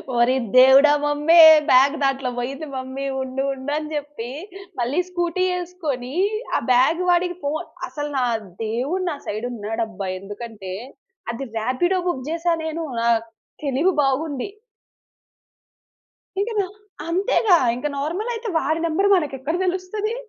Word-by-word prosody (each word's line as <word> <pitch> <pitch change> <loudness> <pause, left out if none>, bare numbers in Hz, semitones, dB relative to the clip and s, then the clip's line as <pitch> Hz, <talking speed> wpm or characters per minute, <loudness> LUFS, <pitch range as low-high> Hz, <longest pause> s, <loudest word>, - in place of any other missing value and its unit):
ఓరి 240 +2 +3 0.2
దేవుడా! 265 +3 +8
Mummy 295 +3 +3 0.3
bag 270 +4 +6
దాంట్లో 270 -1 0
బోయింది 275 +5 -4
మమ్మీ 260 +1 -5 0.2
ఉండు, 260 +1 -3
ఉండు 270 +2 -6
అని 305 0 -4
జెప్పి 290 -5 -5 0.5
మళ్ళీ 255 +8 0
స్కూటీ 350 0 -1 0.2
ఏసుకొని 300 -8 -5 0.4
ఆ - - +1
బ్యాగ్ 270 +8 +4
వాడికి 355 0 +2
ఫోను, 310 +4 -2 0.2
అసలు 295 0 -5
నా 255 - +2 0.4
దేవుడు 265 +12 -2
నా 295 - -3
సైడ్ 215 +4 -3
ఉన్నాడబ్బా! 220 -2 -4
ఎందుకంటే 205 -1 -8 0.6
అది 265 +3 -5
రాపిడో 260 +12 +1
బుక్ 260 -7 -2
జేశానేను. 330 -1 -1 0.2
ఆహ్, 230 -1 +3 0.4
తెలివి 285 +7 +2
బాగుంది. 275 +3 -1 1.9
ఇక 445 - -1
నా 390 - +2 0.4
అంతేగా 380 +1 +3 0.2
ఇంకా 255 +5 -3
నార్మలయితే 430 +10 -3
వాడి 320 +1 -1
నంబర్ 390 +6 +1
మనకెక్కడ 290 -2 -2
దెలుస్తది. 380 +5 -2
290 Hz, 120 wpm, -22 LUFS, 255-345 Hz, 1.9 s, దేవుడా